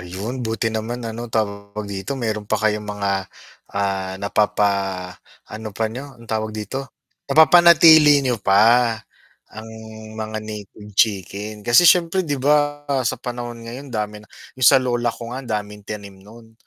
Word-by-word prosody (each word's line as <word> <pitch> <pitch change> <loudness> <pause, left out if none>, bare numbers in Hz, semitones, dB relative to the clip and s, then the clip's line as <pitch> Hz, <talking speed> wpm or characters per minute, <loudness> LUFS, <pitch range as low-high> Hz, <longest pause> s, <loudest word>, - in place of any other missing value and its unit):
ayun 95 +7 -6
buti 115 0 -2
naman 115 +2 -4
ano 115 +1 -5
tawag 100 -1 -3
dito, 95 +7 -6
mayro'n 110 -4 -3
pa 110 - +3
kayong 105 -1 0
mga, 100 -1 -2 0.7
ah, 95 -1 -1
napapaano 100 0 -2
pa 115 - 0
n'yo, 130 +4 -6
ang 115 - -15
tawag 110 0 -1
dito? 105 +5 -4 0.5
Napapanatili 160 0 +7
niyo 125 -2 0
pa, 100 0 +5 1.0
ang 110 +1 -8 0.5
mga 110 0 -4
native 105 0 -9
chicken, 105 0 -2
kasi 120 +8 +6
siyempre 180 +2 +3
'di 145 - 0
ba 145 0 +2 0.2
sa - - -3
panahon 120 -1 -7
ngayon 130 +5 -8
dami 105 -2 -4
na 105 - -19 0.3
yung 130 -2 +5
sa 140 - +7
lola 120 -2 0
ko 115 +1 -6
nga 130 - -4
ang 130 - -12
daming 105 -1 -5
tanim 100 -2 -8
no'n 115 +3 -16
110 Hz, 150 wpm, -21 LUFS, 105-125 Hz, 1.0 s, Napapanatili